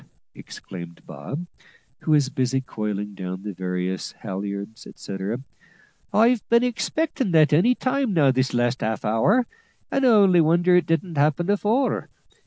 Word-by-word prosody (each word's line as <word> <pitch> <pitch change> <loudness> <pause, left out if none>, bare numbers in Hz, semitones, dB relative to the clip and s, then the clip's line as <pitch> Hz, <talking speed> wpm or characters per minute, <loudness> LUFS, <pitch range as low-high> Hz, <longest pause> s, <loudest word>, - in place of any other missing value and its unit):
exclaimed 85 -2 -10
Bob, 160 +6 -7 0.5
who - - -7
was 150 -3 +4
busy 130 -1 0
coiling 105 -5 -4
down 95 0 -6
the 105 -1 -5
various 90 +1 -3
halliards, 100 +2 -6
etcetera, 100 +5 -5 0.7
"I've 230 +1 +3
been 235 +1 +4
expectin' 260 +1 -1
that 155 -2 +5
any 230 +12 +4
time 255 -5 -1
this 130 -4 +3
last 120 +1 0
half 110 0 -2
hour, 175 - +2 0.5
and 275 - 0
I - - +5
only 195 -6 +5
wonder 175 +3 +3
it 180 -3 +3
didn't 165 0 -1
happen 155 +4 +2
afore. 215 +6 0
145 Hz, 140 wpm, -23 LUFS, -, 0.7 s, that